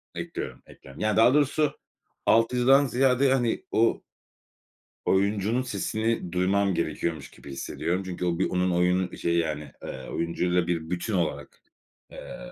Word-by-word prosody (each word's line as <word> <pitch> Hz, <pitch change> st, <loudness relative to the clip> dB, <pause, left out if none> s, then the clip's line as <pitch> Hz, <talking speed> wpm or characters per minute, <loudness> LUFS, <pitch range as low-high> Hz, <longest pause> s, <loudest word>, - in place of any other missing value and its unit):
Ekliyorum, -, -, -6 dB
ekliyorum. 70 Hz, -, -13 dB
Yani, 110 Hz, -1 st, +1 dB
daha 115 Hz, +3 st, +6 dB
doğrusu 150 Hz, 0 st, +2 dB, 0.5 s
alt 115 Hz, +2 st, +4 dB
yazıdan 135 Hz, +3 st, +5 dB
ziyade, 130 Hz, +1 st, +3 dB
hani, 120 Hz, -4 st, 0 dB
o 115 Hz, +1 st, +2 dB, 1.0 s
oyuncunun 100 Hz, +4 st, +1 dB
sesini 110 Hz, -4 st, -2 dB
duymam 95 Hz, +2 st, +2 dB
gerekiyormuş 85 Hz, -3 st, -3 dB
gibi 70 Hz, -, -12 dB
hissediyorum. 85 Hz, +7 st, -3 dB
Çünkü 90 Hz, -1 st, -4 dB
o 85 Hz, -1 st, 0 dB
bir -, -, +1 dB
onun 90 Hz, 0 st, +1 dB
oyunu 90 Hz, +1 st, +1 dB
şeyi, 85 Hz, 0 st, 0 dB
yani, 75 Hz, -2 st, -3 dB
eee, 65 Hz, -1 st, -7 dB
oyuncuyla 90 Hz, +1 st, 0 dB
bir 80 Hz, -2 st, -2 dB
bütün 90 Hz, +4 st, -3 dB
olarak, 85 Hz, -4 st, -2 dB, 0.5 s
eee, -, -, -9 dB
95 Hz, 140 wpm, -26 LUFS, 85-115 Hz, 1.0 s, daha